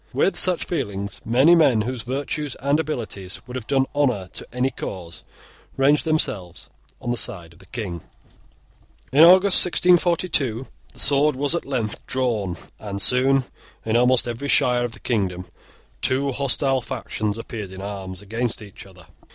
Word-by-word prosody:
With 195 - +1
such 180 0 +2
feelings, 100 - -4
many 130 +9 +4
men 140 -10 +4
whose 125 +2 -3
virtues 140 +3 -4
and 140 +3 0
abilities 110 - -4
would 125 0 -9
have 120 -3 -6
done 135 -1 +2
honour 125 -11 0
to - - -7
any 125 +2 -1
cause, 85 -3 -7 0.6
ranged 145 +4 +3
themselves 105 - -2 0.3
on 120 - -4
the 120 - -1
side 90 -9 -4
of 85 - -22
the 95 - -18
King. 95 -7 -6 1.1
In 140 +4 +4
August 185 +3 +7
1642 170 -8 +2 0.3
the - - -9
sword 145 +1 +4
was 145 +3 0
at 170 - -2
length 120 -6 -3
drawn; 110 -9 -1 0.2
and 100 -2 -6
soon, 130 +7 +4 0.4
in 110 0 0
almost 125 0 +3
every 120 +4 -4
shire 125 -3 +4
of 120 - -6
the - - -12
kingdom, 95 -6 -2 0.6
two 135 +2 +1
hostile 135 0 0
factions 105 -3 -4
appeared 110 -3 -7
in 95 +1 -9
arms 95 -2 -7
against 115 +2 -3
each 100 -1 -12
other. 90 -3 -16
125 Hz, 160 wpm, -22 LUFS, 100-140 Hz, 1.1 s, August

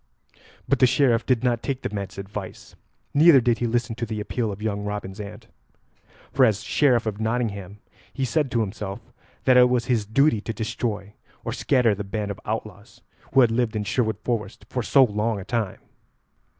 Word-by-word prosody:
But 140 - +2
the 130 - +6
Sheriff 120 -3 +2
did 125 -3 +2
not 120 -2 +1
take 135 -2 -3
the - - -3
man's 100 -2 -5
advice, 100 0 -7 0.4
neither 155 -1 +7
did 120 -1 +1
he 120 - 0
listen 120 0 -1
to 115 - -2
the 110 -1 -4
appeal 110 +1 -2
of 100 - -7
young 105 -1 -2
Robin's 105 -1 -5
aunt. 105 0 -8 0.9
For, 135 - +4
as 110 -4 +3
Sheriff 125 -6 +2
of 110 -1 -3
Nottingham, 105 -4 -2 0.3
he 135 - -2
said 150 +1 0
to 120 -1 +1
himself 100 -2 -4 0.4
that 130 -1 +5
it 125 0 +7
was 125 -2 +1
his 115 -5 0
duty 125 0 +3
to 115 - -4
destroy 105 -2 -3 0.3
or - - -2
scatter 125 -5 +2
the 100 +1 -4
band 105 +1 -3
of 100 - -7
outlaws 105 0 -6 0.3
who 135 - +7
had 120 -3 +4
lived 115 -1 0
in 105 - -1
Sherwood 110 -1 0
Forest 110 -4 -3
for 125 - -2
so 135 +4 +5
long 105 -1 0
a 95 - -8
time. 110 -5 -2
110 Hz, 190 wpm, -24 LUFS, 105-125 Hz, 0.9 s, neither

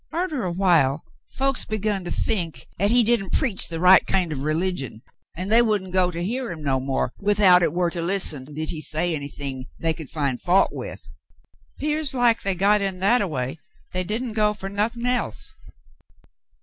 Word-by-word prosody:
Arter 320 -7 -2
a 180 - -1
while, 165 -6 +2 0.2
folks 270 -1 0
begun 210 -2 -2
to - - -4
think 165 - -2
'at 200 +2 +2
he 240 +1 +4
didn't 220 -4 0
preach 225 -8 +1
the 165 -1 -5
right 185 +2 +7
kind 185 -4 +1
of 140 -3 -4
religion, 155 -7 -2 0.3
an' 185 +3 -4
they 230 +2 +6
wouldn't 205 -5 0
go 185 -1 +3
to 170 -1 -4
hear 240 +3 -3
him 160 -3 -8
no 135 -2 +1
more 135 0 -2
without 200 -3 +5
hit 170 - +2
war 175 0 0
to 170 - -3
listen 165 -6 +1
did 155 +1 -1
he 155 - -5
say 165 +3 -1
anythin' 140 -2 -4
they 165 -1 0
could 155 -3 -9
fin' 140 -5 -1
fault 185 +2 +3
with. - - -8 0.7
'Pears 300 -2 -1
like 240 -2 +3
they 195 -1 0
got 200 +3 +3
in 195 -2 -1
that 205 +7 +3
a 200 - 0
way 135 -1 -4 0.3
they 185 0 -1
didn' 225 +5 -3
go 210 -1 +2
fer 195 -1 -6
nothin' 225 +4 -2
else. 245 - -1
185 Hz, 190 wpm, -23 LUFS, 160-215 Hz, 0.7 s, right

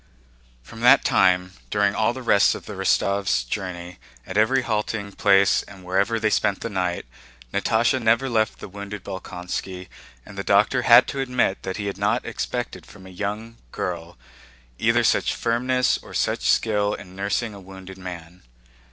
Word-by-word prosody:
From 115 - -12
that 125 +4 +6
time, 90 0 +3 0.2
during 100 -1 +2
all 110 +2 +1
the 130 +1 -8
rest 100 -4 +4
of - - -9
the 105 - -7
Rostóvs' 95 -7 +1
journey, 90 +3 -5 0.3
at 95 - -7
every 125 +5 +3
halting 105 -2 -2
place 100 0 +4
and 95 -2 -14
wherever 100 +5 +1
they 110 -1 +1
spent 100 +1 0
a - - -2
night, 90 -4 -2 0.5
Natásha 120 +3 +1
never 115 +4 +2
left 110 -3 0
the - - -9
wounded 100 0 -8
Bolkónski, 90 -1 -6 0.4
and - - -10
the - - -2
doctor - - +3
had - - +7
to 140 - -4
admit 125 -7 0
that 95 -1 -5
he 100 - -4
had 100 - -4
not - - 0
expected - - -4
from 95 - -14
a 95 - -11
young 105 +4 -5
girl 85 -2 -5 0.6
either - - +3
such - - +2
firmness 125 +2 +1
or - - -12
such - - 0
skill 105 -2 +2
in 95 -2 -12
nursing 100 +3 -2
a 100 - -10
wounded 95 0 -11
man. 90 -1 -9
100 Hz, 170 wpm, -23 LUFS, 95-110 Hz, 0.6 s, had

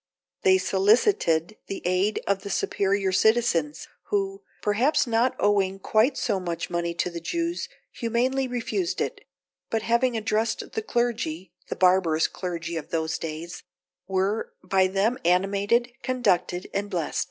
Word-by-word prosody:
They 385 -4 +5
solicited 200 - +2
the 195 - -5
aid 185 +4 +1
of 200 -1 0
the 200 - -7
superior 195 -1 0
citizens, 185 -7 +2 0.2
who, 195 -1 -1 0.2
perhaps 235 +10 +2
not 240 +2 +1
owing 195 -2 +2
quite 220 +7 +2
so 205 -5 0
much 170 -2 -4
money 170 0 -1
to 180 - -1
the 170 - -5
Jews, 335 - -2 0.2
humanely 255 +3 0
refused 250 +9 -2
it; - - -2 0.5
but 225 -1 -1
having 235 +1 +2
addressed 220 +1 -1
the 220 - -2
clergy 215 -8 -2 0.2
(the - - -2
barbarous 180 -4 +3
clergy 170 -2 -4
of 160 - -6
those 160 -1 -1
days) 165 +2 -6 0.5
were 190 +3 0
by 190 0 +3
them 200 +7 0
animated, 200 +7 +2
conducted, 195 -8 0
and 205 +1 -2
blest. 175 -6 -2
200 Hz, 140 wpm, -25 LUFS, 180-235 Hz, 0.5 s, They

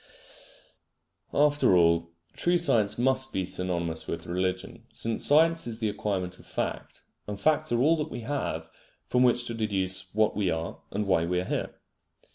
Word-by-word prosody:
After 145 -10 +3
all, 85 -1 +3 0.2
true 175 0 +2
science 115 -11 +2
must 130 +2 +2
be 95 - -1
synonymous 85 -3 -2
with 85 0 -5
religion, 95 +5 -3
since 115 0 0
science 165 +1 +4
is 115 -1 -3
the 110 -2 0
acquirement 95 -3 -3
of - - -17
fact; - - -4 0.2
and 105 -1 -5
facts 155 +3 +1
are 120 - +2
all 155 +5 +4
that 150 - -3
we - - -6
have 140 +5 -4 0.3
from 125 - +1
which 120 -1 +3
to 120 - -4
deduce 95 -4 -2
what 110 -1 +2
we 100 -3 0
are 80 0 -3
and 105 +1 -2
why 90 -4 +2
we 90 +1 0
are 90 - -3
here. - - -3
105 Hz, 170 wpm, -27 LUFS, 90-130 Hz, 0.3 s, science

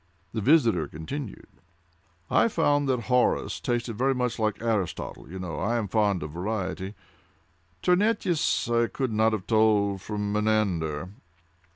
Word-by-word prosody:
The 110 - -2
visitor 120 - +4
continued: 125 - -8 0.7
"I - - +5
found 145 -8 +1
that 125 -2 +1
Horace 125 +1 +1
tasted 120 -2 -2
very 135 +1 +2
much 125 -2 -1
like 110 -2 0
Aristotle;—you 100 - -3
know 85 -5 -5
I 120 - 0
am 110 -3 -1
fond 100 -4 +1
of 75 - -6
variety. 95 +2 -3 0.9
Terentius 180 - +2
I 120 0 +2
could 130 -1 -2
not 110 +1 +3
have 105 -4 -3
told 105 -3 +3
from 105 0 -3
Menander. 95 -7 0
110 Hz, 135 wpm, -27 LUFS, 95-125 Hz, 0.9 s, I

